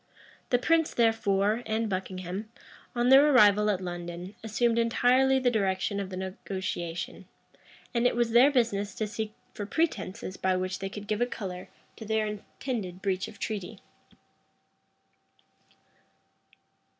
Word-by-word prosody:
The 245 - +4
prince, 325 +5 +2
therefore, 220 -2 +2
and 220 +1 0
Buckingham, 185 +1 -4 0.5
on 240 +1 +2
their 275 +3 +8
arrival 210 -5 +6
at 200 -3 +1
London, 175 +1 -6
assumed 230 +2 +1
entirely 250 +3 +3
the 255 -2 +2
direction 200 -2 0
of 195 -2 -4
the 185 - -6
negotiation; 185 -2 -5 0.7
and 240 0 +3
it - - 0
was 240 -1 +1
their 245 +4 +7
business 210 -7 0
to 215 - -1
seek 215 0 -5 0.2
for 205 - -5
pretences 230 - -2
by 185 0 +1
which 185 +1 -2
they 195 0 -4
could 205 0 -8
give 215 +2 -2
a 245 - +3
color 185 -6 -6 0.3
to 220 - -8
their 220 0 +1
intended 210 -2 -5
breach 190 -1 0
of 210 - -12
treaty. 210 0 -4
210 Hz, 140 wpm, -28 LUFS, 190-235 Hz, 0.7 s, their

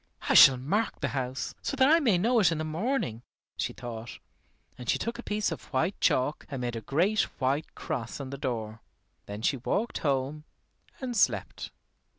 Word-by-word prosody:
"I - - +3
shall 135 -2 +9
mark 200 - -1
the 140 - -1
house, 130 -1 -3
so 275 - -3
that 260 0 +5
I 325 +3 +6
may 230 - +3
know 230 +6 +3
it 190 -5 +4
in 165 - -1
the 155 - -2
morning," 155 - -2 0.3
she - - -2
thought. 115 -1 -7 0.6
And 125 -2 -8
she - - +3
took 235 +1 -4
a - - -3
piece 210 -4 -1
of 160 - -6
white 160 +8 -1
chalk 130 +4 +1
and 135 -4 -4
made 120 -1 -2
a 115 - -4
great 180 - +2 0.2
white 135 +3 -1
cross 120 +3 -4
on 135 -2 -6
the 140 - -5
door. 115 -5 -4 0.5
Then 105 +2 -7
she 135 - +2
walked 205 - -1
home 140 +1 -1 0.6
and 250 -2 -3
slept. 205 - 0
145 Hz, 190 wpm, -28 LUFS, 125-210 Hz, 0.6 s, shall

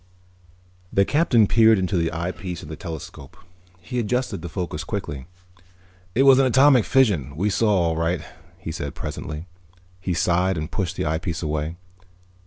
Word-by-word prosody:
_ - - -31 0.9
The 100 - +3
Captain 140 -7 +3
peered 110 +1 +5
into 95 +1 -1
the 85 -2 +1
eyepiece 85 +1 -5
of 75 - -10
the 80 - -5
telescope. 80 -7 -9 0.4
He 90 +9 -4
adjusted 125 -3 -1
the 85 - -6
focus 85 -2 -4
quickly. 75 -6 -5 0.9
"It 130 - +4
was 135 -1 +7
an 135 - +4
atomic 130 -1 +5
fission 95 - +2
we 100 +7 0
saw, 110 +2 +2
all 85 -5 +2
right," 80 0 -1 0.3
he 85 -3 -6
said 75 -4 -5
presently. 75 +2 -6 0.5
He 90 -1 -2
sighed 90 +2 +1
and 75 0 -4
pushed 90 -3 -2
the - - -2
eyepiece 80 +2 -2
away. 75 +1 -2
90 Hz, 165 wpm, -23 LUFS, 80-105 Hz, 0.9 s, was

